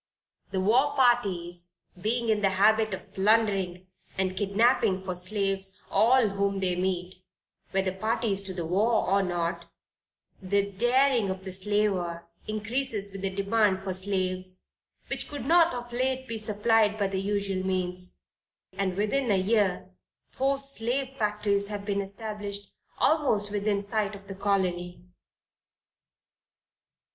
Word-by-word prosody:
The 190 - -2
war 255 +9 +3
parties 180 -9 +1 0.3
being 230 +3 0
in 215 -1 +2
the 195 - +3
habit 220 +2 +4
of - - -15
plundering 195 -3 +1 0.3
and 190 -1 0
kidnapping 200 -1 +2
for 185 -1 -3
slaves 195 0 0
all 235 -1 +4
whom 200 0 -1
they 185 -2 0
meet, 180 0 -2 0.5
whether 190 -1 0
parties 215 0 0
to 190 - -4
the 170 -2 -3
war 215 +7 +2
or 200 +1 +3
not, 170 -2 -2 0.7
the 200 +1 0
daring 240 +1 +2
of 190 0 -4
the 190 - -5
slaver 190 -3 0 0.2
increases 215 -1 -2
with 195 0 -8
the 195 - 0
demand 200 0 +1
for 190 -1 -2
slaves, 185 -1 -2 0.4
which - - 0
could 285 -4 -6
not 335 +2 +5
of 240 0 -7
late 260 +1 -1
be 230 -1 -4
supplied 215 0 +2
by 205 - +1
the 190 -1 -1
usual 200 -1 -1
means; 180 -1 -2 0.6
and 190 -1 -2
within 235 +5 0
a 200 - +4
year 190 -2 +1 0.4
four 275 +1 +1
slave 270 0 -2
factories 210 -3 0
have 205 -1 -5
been 200 -1 0
established 205 0 -6 0.3
almost 225 -10 +2
within 205 0 0
sight 205 0 -1
of 195 0 -13
the 195 - -6
Colony." 180 -3 -1
200 Hz, 135 wpm, -27 LUFS, 190-220 Hz, 0.7 s, not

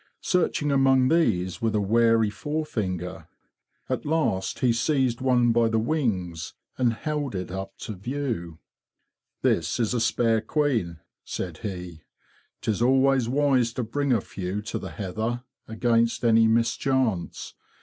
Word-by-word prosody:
Searching 160 -5 +1
among 135 -1 +4
these 95 - +1
with 110 -1 0
a - - +3
wary 115 +1 +3
forefinger, 100 - -4 0.6
at - - -2
last 145 -12 0
he 125 -2 +2
seized 130 -1 +1
one 125 -2 +3
by 115 0 +3
the 115 - +1
wings 110 - -1 0.2
and 125 -3 +2
held 145 -1 -3
it 90 -1 -4
up 95 +1 -6
to 110 - -6
view. 105 - -4 0.4
'* - - -55
This - - +1
is 115 0 +1
a 120 - 0
spare 115 -1 +2
queen,"' 115 - -1 0.2
said 90 -4 -5
he. 90 -5 -6 0.6
'''Tis 110 0 -1
always 130 -1 +3
wise 130 -4 +2
to 125 - -2
bring 140 +5 -1
a 115 -5 +3
few 95 +2 -5
to 110 - -4
the - - -6
heather, 110 +5 -3 0.2
against 115 +1 +1
any 115 -1 +5
mis 115 0 +2
chance. 130 -10 -1
115 Hz, 145 wpm, -25 LUFS, 100-130 Hz, 0.6 s, any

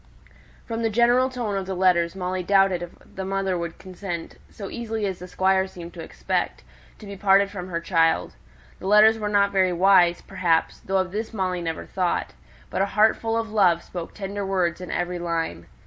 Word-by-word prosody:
From 230 -1 -4
the 225 - +1
general 240 +4 +3
tone 240 -5 -3
of 195 -1 -3
the 190 - -3
letters, 180 -2 +2
Molly 185 0 -2
doubted 195 -1 +3
if 175 - -5 0.2
the 190 - -5
mother 195 0 -1
would 170 -1 -4
consent, 185 -2 -7
so 200 - -8
easily 225 -2 -3
as 190 -2 -3
the 180 - -8
Squire 190 +1 +2
seemed 175 -2 -10
to - - -8
expect, - - -3 0.3
to 215 - -12
be 200 0 -7
parted 195 0 +3
from 185 -3 -6
her 170 -2 -3
child; 165 -1 +1 0.5
the 190 - -6
letters 215 +2 +6
were 210 -1 -2
not 200 -1 +3
very 190 -2 +2
wise, 180 -1 +4
perhaps 180 -4 0
(though 195 0 -1
of 185 -1 0
this 220 +3 -4
Molly 185 -3 -1
never 165 -1 -4
thought), 180 -2 -1 0.4
but - - -1
a 195 - +2
heart 220 +1 +5
full 225 0 -2
of 225 -1 -3
love 180 -6 +3
spoke 175 -2 -7
tender 200 0 -4
words 185 -3 0
in 180 - -7
every 175 0 -2
line. 165 - -3
190 Hz, 200 wpm, -24 LUFS, 175-205 Hz, 0.5 s, letters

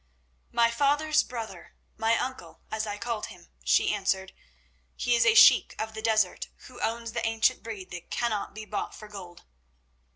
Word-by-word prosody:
"My 235 -1 +3
father's 295 +4 +2
brother—my 225 0 -4
uncle, 260 +1 -5
as 220 0 -2
I 205 0 -4
called 230 -1 -3
him," - - -15
she - - +3
answered. 190 -2 -1 0.6
"He 245 - 0
is 235 - +3
a 450 - +5
sheik - - +7
of 220 0 -4
the 220 - -6
desert, 215 -4 +1 0.2
who 250 -1 -12
owns 230 0 -2
the - - -3
ancient 225 0 +2
breed 205 -5 -8
that 175 -1 -8
cannot 220 -4 -2
be 215 0 -7
bought - - -4
for 215 - -11
gold." 185 -4 -11
220 Hz, 165 wpm, -28 LUFS, 210-235 Hz, 0.6 s, sheik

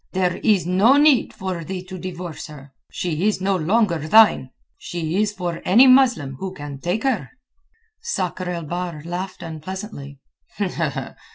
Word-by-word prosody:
There 185 -2 0
is 205 -6 +2
no 200 +10 +4
need 290 -4 +4
for 185 -3 -5
thee 185 +2 -5
to 185 0 -9
divorce 175 -3 -7
her. 140 -2 -13 0.2
She 175 +2 -2
is 215 - +1
no 195 +1 +1
longer 185 +1 +1
thine. 160 -3 +5 0.3
She 175 +3 -3
is 210 -1 +1
for 175 -4 -4
any 235 +8 +6
Muslim 245 - +4
who 190 -1 -5
can 145 -3 -8
take 180 +8 -2
her." 225 - 0 0.7
Sakr 185 - -3
el 170 -1 -3
Bahr 170 -1 -5
laughed 180 +2 -5
unpleasantly. 160 -3 -7
180 Hz, 150 wpm, -22 LUFS, 165-205 Hz, 0.7 s, any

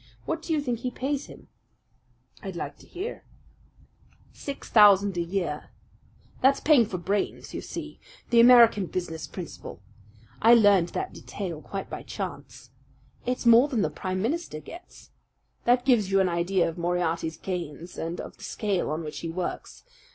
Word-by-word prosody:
What 325 - -2
do 330 - -6
you 310 -2 +2
think 245 -5 -2
he 250 - -2
pays 275 +3 -3
him?" - - -14 0.9
"I'd - - -6
like - - -5
to - - -17
hear." 380 +6 -6 1.1
"Six 280 -1 -7
thousand 200 -3 +6
a 175 - 0
year. 170 -4 -3 0.7
That's 270 +2 +4
paying 280 -8 +5
for 185 - -4
brains, 195 +4 -2
you - - -4
see - - -7 0.3
the 235 - +5
American 235 -5 +7
business 165 -3 -4
principle. 180 -3 -8 0.6
I 230 +2 +8
learned 200 -6 +5
that - - -4
detail 175 -6 -6
quite 195 +3 -6
by - - -6
chance. - - -7 0.6
It's 250 0 -2
more 235 +4 +7
than 240 -8 0
the - - -1
Prime 185 0 -3
Minister 295 - -2
gets. 340 - -13 0.5
That 245 +1 +3
gives 235 -7 +3
you 195 0 +3
an 190 -1 +3
idea 175 +2 +1
of 165 +1 -6
Moriarty's 170 -2 -1
gains 175 -2 -6
and 165 +2 -4
of - - -8
the - - -14
scale 200 -7 -1
on 155 +2 -3
which 150 -1 -6
he 165 - -5
works. 175 +2 -5
195 Hz, 165 wpm, -26 LUFS, 175-245 Hz, 1.1 s, I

